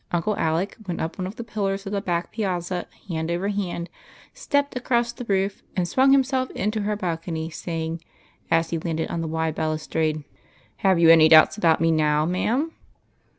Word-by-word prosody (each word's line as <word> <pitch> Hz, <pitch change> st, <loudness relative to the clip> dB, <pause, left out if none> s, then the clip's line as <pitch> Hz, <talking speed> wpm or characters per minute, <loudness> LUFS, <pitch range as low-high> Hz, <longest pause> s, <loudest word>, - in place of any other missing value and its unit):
Uncle 175 Hz, +5 st, 0 dB
Alec 165 Hz, +4 st, 0 dB
went 175 Hz, -, -3 dB
up 165 Hz, +4 st, -4 dB
one 185 Hz, -, -2 dB
of 195 Hz, -, -8 dB
the 235 Hz, -, -6 dB
pillars 200 Hz, -3 st, -2 dB
of 195 Hz, -, -5 dB
the 200 Hz, -1 st, -1 dB
back 175 Hz, -2 st, -2 dB
piazza 180 Hz, -4 st, -2 dB, 0.2 s
hand 160 Hz, -3 st, -3 dB
over 175 Hz, +4 st, -1 dB
hand, 185 Hz, -4 st, -3 dB, 0.5 s
stepped 285 Hz, -, -1 dB
across 240 Hz, -1 st, 0 dB
the 240 Hz, +1 st, -8 dB
roof, 195 Hz, -1 st, 0 dB
and 180 Hz, -2 st, 0 dB
swung 265 Hz, +7 st, +4 dB
himself 265 Hz, -1 st, +2 dB
into 215 Hz, +1 st, -1 dB
her 210 Hz, +1 st, -1 dB
balcony, 165 Hz, -4 st, -3 dB
saying, 165 Hz, 0 st, -4 dB, 0.5 s
as 165 Hz, 0 st, +2 dB
he 165 Hz, -, -1 dB
landed 160 Hz, -1 st, -3 dB
on 170 Hz, -, -2 dB
the 165 Hz, -, -3 dB
wide 160 Hz, 0 st, -1 dB
balustrade: 155 Hz, 0 st, -1 dB, 0.3 s
" -, -, -33 dB
Have 190 Hz, -2 st, +3 dB
you 165 Hz, -1 st, +7 dB
any 160 Hz, -1 st, +7 dB
doubts 155 Hz, -1 st, +7 dB
about 170 Hz, -7 st, +3 dB
me 165 Hz, 0 st, +3 dB
now, 150 Hz, -1 st, +2 dB
ma'am 235 Hz, -, 0 dB
175 Hz, 190 wpm, -24 LUFS, 160-210 Hz, 0.5 s, you